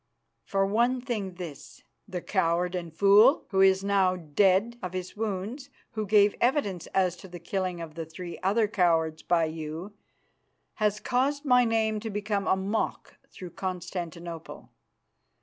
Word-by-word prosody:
"For 195 0 +1
one 235 +6 +2
thing, 215 -7 -4
this: 170 -6 -9 0.2
The 185 -3 -5
coward 180 -1 +1
and 175 -2 -4
fool, 205 - +5
who 190 - +1 0.2
now 195 -2 +2
is 180 - -9
dead 205 +6 +3
of 180 -2 -5
his 185 0 -5
wounds 220 +6 -4 0.2
who 215 -2 -3
gave 205 0 +5
evidence 240 - +1
as 185 -2 +1
to 190 - -11
the 175 -1 -9
killing 180 +1 -3
of 160 -2 -7
the 165 +1 -5
three 170 +1 -8
other 210 +4 +2
cowards 165 -5 +1
by 170 -2 +2
you, 160 +4 -6 0.8
has 210 -1 +1
caused 280 +5 0
my 250 -2 +5
name 220 -1 +1
to 225 +1 -5
become 205 -1 -2
a - - +4
mock 195 +3 -3
throughout 175 -2 -10
Constantinople. 175 -2 -6
190 Hz, 150 wpm, -28 LUFS, 175-215 Hz, 0.8 s, fool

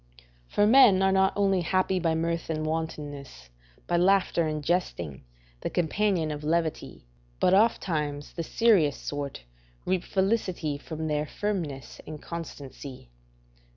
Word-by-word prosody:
["For 205 - +2
men 220 -5 +7
are 190 - +4
not 190 0 +4
only 195 -2 +2
happy 185 +2 +1
by 165 -2 +1
mirth 165 +1 -2
and 155 -1 -2
wantonness, 145 - -5 0.3
by 175 - +1
laughter 185 -2 +3
and 155 -1 -3
jesting, 85 - -2 0.4
the - - -3
companion 175 -1 0
of 150 0 -5
levity, 160 - -2 0.3
but 180 - +3
ofttimes 155 -9 +1
the 170 - -4
serious 180 -5 +3
sort 140 - -5 0.4
reap 185 -1 0
felicity 190 -7 -1
from 160 +1 -6
their 150 -1 -1
firmness 165 -12 -4
and 155 0 -7
constancy." 140 - -8
165 Hz, 130 wpm, -27 LUFS, 150-190 Hz, 0.4 s, men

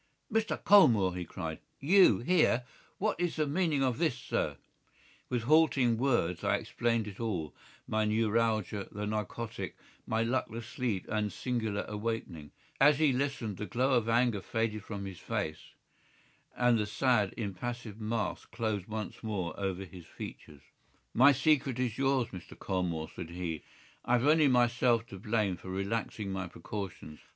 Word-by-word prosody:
"Mr. 225 0 +1
Colmore!" 115 - +6
he 90 - -3
cried. 80 -2 -6 0.2
"You 175 - +6
here! 135 -4 +3 0.3
What 210 -1 0
is 175 -1 0
the 155 - +1
meaning 150 -2 +1
of 130 -1 0
this, 160 -7 +1
sir?" - - -2 0.7
With 125 -2 -1
halting 135 -5 +4
words 120 - +1
I - - +3
explained 115 -2 0
it 100 -2 -9
all, 90 - -2 0.3
my 110 0 +1
neuralgia, 110 -2 +1
the 105 +1 -4
narcotic, 110 +2 -4 0.3
my 110 +1 +1
luckless 115 -1 -2
sleep 120 -5 -2
and 105 -1 -1
singular 110 -4 -2
awakening. 105 -8 -4 0.3
As 145 +1 +6
he 150 -3 +3
listened 125 -6 -2
the 105 - -4
glow 130 +3 +1
of 115 -2 +2
anger 115 -3 +2
faded 110 0 -2
from 100 -2 -6
his 95 -3 -7
face, 80 0 -4 0.8
and 120 -2 +4
the 105 - -1
sad, 110 -3 +2
impassive 115 +1 -5
mask 110 0 -2
closed 110 -5 -2
once 110 -1 -5
more 95 -7 -3
over 95 -1 -2
his 90 -3 -12
features. 75 -2 -9 0.5
"My 130 +4 +7
secret 140 -2 +2
is 125 -2 -1
yours, 135 -3 +2
Mr. 90 -5 -10
Colmore," 90 -4 -2
said 85 -3 -6
he. 85 -3 -4 0.4
"I 120 - 0
have 125 +1 +3
only 155 0 +5
myself 120 -2 +3
to 95 - -8
blame 105 -3 0
for 95 - -10
relaxing 100 +1 -2
my 95 -1 -3
precautions. 95 -5 -7
115 Hz, 155 wpm, -31 LUFS, 100-125 Hz, 0.8 s, My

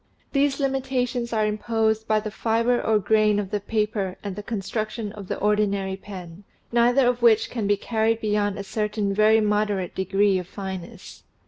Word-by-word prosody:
These 280 0 +1
limitations 260 -3 -1
are 215 -2 +1
im 210 0 -2
posed 220 -1 0
by 215 0 +3
the 215 0 -5
fiber 230 +3 +1
or 220 -1 +2
grain 210 0 +3
of 200 -2 -3
the 210 - 0
paper 210 -2 -2
and 200 -2 -4
the 210 - -5
construc 215 0 -3
tion 215 -2 -5
of 205 -2 -9
the - - -3
ordinary 200 -2 +1
pen, 185 -2 -10 0.3
neither 240 +3 +4
of 245 0 +1
which 225 -2 +4
can 225 -5 -2
be 205 0 +3
carried 220 +2 0
beyond 210 -2 0
a 200 - -4
certain 210 0 -2
very 215 +2 +4
moderate 210 -3 0
degree 195 +1 +2
of 180 - -7
fineness. 190 -2 -8
215 Hz, 185 wpm, -24 LUFS, 200-225 Hz, 0.3 s, neither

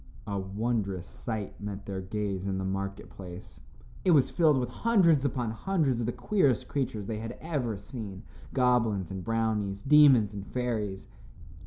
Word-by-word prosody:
A 100 -1 -2
wondrous 100 -1 -2
sight 110 -1 -5
met 100 -1 -5
their 95 -1 -4
gaze 100 0 -3
in 95 -1 -1
the 95 - -2
market 95 +1 -3
place. 90 0 -10 0.4
It - - +2
was 150 -7 +5
filled 155 -5 +4
with 125 -2 -1
hundreds 170 - +3
upon 120 -4 -1
hundreds 140 - 0
of 115 - -1
the - - +1
queerest 130 - +1
creatures 115 -7 -2
they 110 +1 -3
had 115 +2 -6
ever 135 -10 -2
seen, 100 -2 -7 0.3
goblins 115 -8 +2
and 95 -1 -5
brownies, 110 -3 -1
demons 135 -7 +6
and 100 -1 -7
fairies. 110 -6 -2
110 Hz, 160 wpm, -29 LUFS, 100-130 Hz, 0.4 s, demons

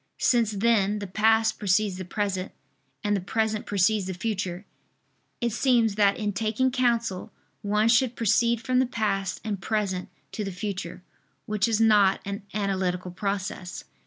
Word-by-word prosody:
Since 235 -3 +3
then, 210 -1 +2
the 205 - -5
past 220 +3 +2
precedes 200 -1 +1
the 185 - -5
present, 195 0 -3 0.5
and 205 -1 +1
the 195 - -1
present 215 +3 -1
precedes 205 0 +2
the 190 - -4
future, 190 -2 -3 0.7
it 235 -1 0
seems 235 -2 +3
that 200 -1 +3
in 210 -1 -2
taking 225 +5 0
counsel 235 -7 0 0.3
one 210 +2 +1
should 240 +1 +3
proceed 230 +1 +2
from 255 0 +2
the 260 - +2
past 195 -5 -1
and 205 -4 -3
present 195 -3 -2 0.2
to 215 - -4
the 195 - -4
future: 180 -2 -5 0.4
which 210 0 0
is 225 -2 +1
not 210 -4 +5
an 200 +2 -4
analytical 185 -3 -1
process. 195 -1 -4
210 Hz, 155 wpm, -26 LUFS, 195-225 Hz, 0.7 s, not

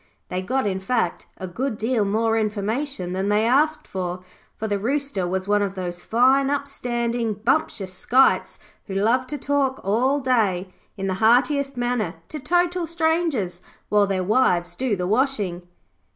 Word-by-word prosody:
They 180 0 -2
got, 260 +7 -1
in 190 -2 -1
fact, 190 -2 -1
a 185 - -6
good 225 +6 -3
deal 225 0 +1
more 225 +3 +1
information 215 -1 -2
than 190 +2 -1
they 210 +1 +3
asked 300 +5 +2
for, 180 -1 -4 0.3
for 220 - -3
the 205 -1 -1
Rooster 260 -4 -1
was 190 +1 -2
one 205 0 +3
of 200 -1 -2
those 175 -1 -5
fine 260 +4 +3
up 280 0 -1
standing, 235 -4 -2
bumptious 210 -4 -1
skites 250 +8 +2 0.3
who 195 - -5
love 235 +6 +2
to 295 - -3
talk 280 -1 0
all 250 +8 +2
day, 200 -8 0 0.2
in 195 - -3
the 190 - 0
heartiest 275 +4 +3
manner, 240 -8 -1
to 305 - -5
total 350 +4 +1
strangers 320 - 0 0.3
while 205 -1 +4
their 190 -1 -1
wives 180 -5 +2
do 250 -2 0
the 180 -1 -3
washing. 205 -6 0
225 Hz, 165 wpm, -23 LUFS, 190-270 Hz, 0.3 s, while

